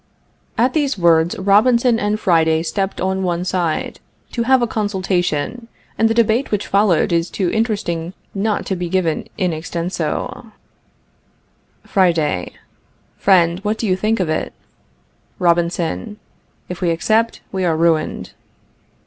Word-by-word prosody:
At 250 Hz, +3 st, +2 dB
these 285 Hz, -5 st, 0 dB
words 170 Hz, -1 st, +3 dB
Robinson 230 Hz, +5 st, +3 dB
and 210 Hz, 0 st, -1 dB
Friday 160 Hz, -3 st, +2 dB
stepped 195 Hz, +3 st, -2 dB
on 190 Hz, +1 st, -1 dB
one 175 Hz, -1 st, -1 dB
side, 175 Hz, -4 st, -2 dB, 0.3 s
to 235 Hz, -, -2 dB
have 260 Hz, +1 st, +3 dB
a -, -, +4 dB
consultation, 195 Hz, -1 st, -2 dB, 0.3 s
and 225 Hz, -, +2 dB
the 225 Hz, -, 0 dB
debate 235 Hz, +3 st, +2 dB
which 210 Hz, -1 st, -1 dB
followed 195 Hz, -3 st, +2 dB
is 170 Hz, 0 st, +1 dB
too 185 Hz, -4 st, -1 dB
interesting 195 Hz, -7 st, -1 dB, 0.2 s
not 205 Hz, +1 st, -1 dB
to 190 Hz, -, -2 dB
be 175 Hz, -1 st, -4 dB
given 170 Hz, -4 st, 0 dB
in 180 Hz, -4 st, 0 dB
extenso: 170 Hz, +6 st, -4 dB, 1.3 s
Friday. 165 Hz, -, +1 dB, 0.7 s
Friend, 175 Hz, -3 st, +3 dB
what 210 Hz, +2 st, -2 dB
do 225 Hz, -, -3 dB
you 185 Hz, -3 st, +2 dB
think 215 Hz, +4 st, 0 dB
of 185 Hz, -, 0 dB
it? 155 Hz, 0 st, -2 dB, 0.8 s
Robinson. 175 Hz, +4 st, 0 dB, 0.5 s
If 180 Hz, +1 st, -7 dB
we 175 Hz, -, +1 dB
accept 220 Hz, +7 st, +1 dB
we 190 Hz, -1 st, -2 dB
are 165 Hz, -3 st, +1 dB
ruined. 165 Hz, -1 st, 0 dB
185 Hz, 135 wpm, -19 LUFS, 170-215 Hz, 1.3 s, a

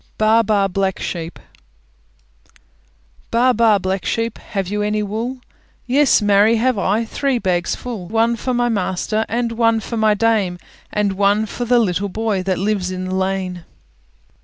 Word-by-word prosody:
BAA, 220 Hz, +1 st, +4 dB
BAA, 205 Hz, -3 st, +1 dB
BLACK 195 Hz, 0 st, -1 dB
SHEEP 165 Hz, -1 st, -5 dB, 1.9 s
Baa, 250 Hz, +2 st, +3 dB
baa, 225 Hz, -2 st, +4 dB
Black 190 Hz, 0 st, -2 dB
Sheep, 230 Hz, 0 st, -2 dB
Have 195 Hz, -3 st, -4 dB
you 210 Hz, +2 st, -2 dB
any 210 Hz, 0 st, 0 dB
wool? 230 Hz, +5 st, -4 dB, 0.4 s
Yes, 265 Hz, -2 st, +3 dB
marry, 205 Hz, +2 st, +4 dB
have 250 Hz, +2 st, +1 dB
I, 210 Hz, +4 st, +1 dB
Three 270 Hz, +3 st, -1 dB
bags 180 Hz, -5 st, 0 dB
full: 225 Hz, -8 st, -7 dB
One 225 Hz, +3 st, +1 dB
for 250 Hz, +2 st, -2 dB
my 240 Hz, 0 st, +1 dB
master, 215 Hz, 0 st, -1 dB
And 235 Hz, 0 st, -1 dB
one 230 Hz, -1 st, +2 dB
for 230 Hz, +2 st, -5 dB
my 215 Hz, -1 st, +3 dB
Dame, 205 Hz, -4 st, +1 dB, 0.3 s
And 205 Hz, -2 st, 0 dB
one 200 Hz, +2 st, +2 dB
for 245 Hz, +3 st, -5 dB
the 245 Hz, +1 st, +3 dB
little 200 Hz, -3 st, 0 dB
boy 215 Hz, -1 st, -1 dB
That 185 Hz, 0 st, -1 dB
lives 195 Hz, -1 st, -1 dB
in 185 Hz, 0 st, -4 dB
the 185 Hz, -, -4 dB
lane! 190 Hz, -2 st, -2 dB
210 Hz, 160 wpm, -19 LUFS, 190-230 Hz, 1.9 s, BAA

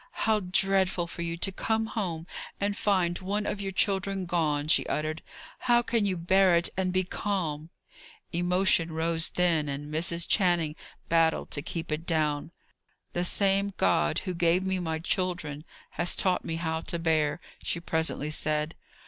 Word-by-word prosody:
"How 220 Hz, -1 st, +3 dB
dreadful 190 Hz, -1 st, +2 dB
for 170 Hz, 0 st, -7 dB
you 170 Hz, 0 st, -3 dB
to 195 Hz, +3 st, 0 dB
come 220 Hz, +3 st, 0 dB
home 175 Hz, -8 st, -3 dB, 0.3 s
and 200 Hz, 0 st, 0 dB
find 185 Hz, -6 st, +1 dB
one 205 Hz, +3 st, -2 dB
of 205 Hz, -, -3 dB
your 195 Hz, -1 st, -3 dB
children 195 Hz, -1 st, +1 dB
gone!" 155 Hz, -4 st, 0 dB
she 160 Hz, -, +4 dB
uttered. 155 Hz, +1 st, -2 dB, 0.4 s
"How 240 Hz, -1 st, +3 dB
can 230 Hz, -3 st, +1 dB
you 185 Hz, -2 st, -1 dB
bear 185 Hz, +1 st, +4 dB
it 170 Hz, +1 st, +1 dB
and 185 Hz, -1 st, 0 dB
be 185 Hz, +1 st, +1 dB
calm!" 170 Hz, -5 st, -3 dB, 0.6 s
Emotion 175 Hz, -1 st, +3 dB
rose 165 Hz, +1 st, 0 dB
then, 165 Hz, -4 st, +1 dB
and 145 Hz, +2 st, -5 dB
Mrs. 170 Hz, +1 st, +1 dB
Channing 175 Hz, -6 st, +2 dB, 0.3 s
battled 165 Hz, -1 st, +2 dB
to 145 Hz, -, -2 dB
keep 165 Hz, +1 st, -5 dB
it 155 Hz, +2 st, -3 dB
down. 155 Hz, -2 st, 0 dB, 0.6 s
"The 175 Hz, -, 0 dB
same 195 Hz, +2 st, +2 dB
God 75 Hz, -5 st, +2 dB
who 185 Hz, -, -2 dB
gave 170 Hz, +1 st, +2 dB
me 190 Hz, 0 st, -1 dB
my 160 Hz, -2 st, -2 dB
children, 165 Hz, -3 st, -2 dB, 0.3 s
has 175 Hz, -, 0 dB
taught 185 Hz, -1 st, +1 dB
me 165 Hz, -, -3 dB
how 160 Hz, -1 st, -2 dB
to 170 Hz, -, -2 dB
bear," 160 Hz, -2 st, +1 dB, 0.2 s
she -, -, -1 dB
presently 160 Hz, -2 st, -1 dB
said. 155 Hz, +1 st, 0 dB
170 Hz, 165 wpm, -28 LUFS, 160-190 Hz, 0.6 s, she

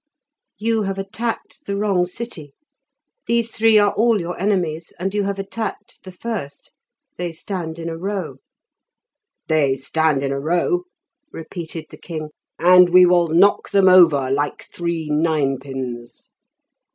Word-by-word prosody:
"You 225 Hz, +2 st, 0 dB
have 195 Hz, -1 st, -3 dB
attacked 220 Hz, +4 st, -4 dB
the 200 Hz, -, -2 dB
wrong 195 Hz, -4 st, +1 dB
city; 180 Hz, -8 st, -8 dB, 0.7 s
these 235 Hz, -1 st, +1 dB
three 225 Hz, 0 st, +4 dB
are 205 Hz, -1 st, +4 dB
all 225 Hz, 0 st, +2 dB
your 175 Hz, 0 st, -4 dB
enemies, 175 Hz, -5 st, -1 dB
and 190 Hz, +2 st, -3 dB
you 205 Hz, -, +1 dB
have 200 Hz, 0 st, -2 dB
attacked 205 Hz, +1 st, -6 dB
the 185 Hz, -, -10 dB
first. 180 Hz, -8 st, -6 dB, 0.5 s
They 175 Hz, -1 st, -3 dB
stand 165 Hz, -1 st, -5 dB
in 165 Hz, 0 st, -6 dB
a 165 Hz, -, -4 dB
row." 195 Hz, -2 st, -4 dB, 1.1 s
"They 150 Hz, -4 st, +2 dB
stand 150 Hz, +1 st, 0 dB
in 135 Hz, -, -1 dB
a 140 Hz, -, -2 dB
row," 175 Hz, -, 0 dB, 0.5 s
repeated 165 Hz, 0 st, -7 dB
the -, -, -11 dB
king; 155 Hz, -3 st, -7 dB, 0.3 s
"and 180 Hz, +1 st, +6 dB
we 180 Hz, +1 st, +7 dB
will 175 Hz, -1 st, +4 dB
knock 175 Hz, +6 st, +3 dB
them 195 Hz, -1 st, +4 dB
over 160 Hz, -8 st, +6 dB
like 145 Hz, +1 st, -2 dB
three 170 Hz, -2 st, -3 dB
nine 150 Hz, -4 st, +1 dB
pins." 130 Hz, -3 st, -7 dB
175 Hz, 145 wpm, -20 LUFS, 155-200 Hz, 1.1 s, we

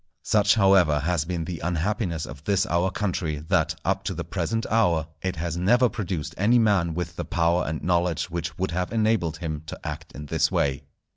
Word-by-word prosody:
Such, 105 Hz, -1 st, +3 dB
however, 95 Hz, -8 st, +4 dB
has 80 Hz, 0 st, 0 dB
been 85 Hz, -1 st, -3 dB
the 85 Hz, -1 st, -5 dB
unhappiness 85 Hz, 0 st, -1 dB
of -, -, -10 dB
this 100 Hz, -1 st, +2 dB
our 90 Hz, -2 st, +1 dB
country, 90 Hz, -6 st, -2 dB
that, -, -, +2 dB
up -, -, 0 dB
to -, -, -2 dB
the -, -, -3 dB
present 115 Hz, +1 st, -2 dB
hour, 90 Hz, -9 st, +3 dB, 0.2 s
it 95 Hz, -1 st, -2 dB
has 85 Hz, +1 st, -3 dB
never 120 Hz, +8 st, +4 dB
produced 95 Hz, -9 st, -4 dB
any 110 Hz, +5 st, +4 dB
man 100 Hz, -8 st, +2 dB
with 85 Hz, -1 st, -4 dB
the 85 Hz, -, -2 dB
power 85 Hz, +2 st, +1 dB
and 80 Hz, 0 st, -3 dB
knowledge 85 Hz, -3 st, +1 dB
which 85 Hz, -1 st, -4 dB
would 95 Hz, 0 st, -1 dB
have 90 Hz, +1 st, -2 dB
enabled 110 Hz, -8 st, +1 dB
him 80 Hz, -3 st, -4 dB
to -, -, -7 dB
act -, -, -6 dB
in 75 Hz, -, -8 dB
this 80 Hz, -1 st, +1 dB
way. 70 Hz, -1 st, 0 dB
85 Hz, 200 wpm, -25 LUFS, 80-100 Hz, 0.2 s, however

